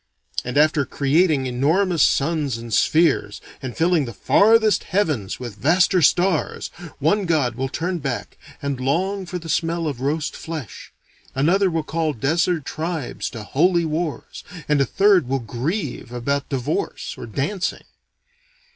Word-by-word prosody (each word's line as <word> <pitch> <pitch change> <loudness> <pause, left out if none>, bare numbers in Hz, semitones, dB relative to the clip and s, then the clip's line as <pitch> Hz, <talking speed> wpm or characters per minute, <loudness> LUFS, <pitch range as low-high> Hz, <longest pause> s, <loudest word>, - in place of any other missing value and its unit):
And 125 +2 -3
after 150 -1 +4
creating 145 +1 +2
enormous 160 +8 +1
suns 145 -4 +2
and 115 -1 -7
spheres, 160 +6 +2 0.2
and 130 -3 -6
filling 165 -3 +2
the 115 - -7
farthest 220 0 +4
heavens 155 - -1
with 120 -5 -7
vaster 180 +5 +4
stars, 175 +1 +1 0.3
one 190 +8 +1
god 145 -7 +1
will 130 +3 -3
turn 175 +5 -2
back 135 -5 -4 0.3
and 140 -2 -2
long 185 +9 -1
for 180 - -4
the 165 -1 -9
smell 165 +1 0
of 140 -5 -3
roast 150 +3 -1
flesh, 155 - -7 0.4
another 180 +8 +3
will 165 -2 -1
call 160 0 -1
desert 160 +5 0
tribes 160 -3 -4
to 115 - -8
"holy" 170 - +2
wars, 160 0 -4 0.2
and 150 -2 +3
a - - +3
third 195 -5 +4
will 135 +2 0
grieve 130 - -4
about 140 +3 -2
divorce 135 +2 -2
or - - -8
dancing. 150 - -2
155 Hz, 145 wpm, -22 LUFS, 135-175 Hz, 0.4 s, after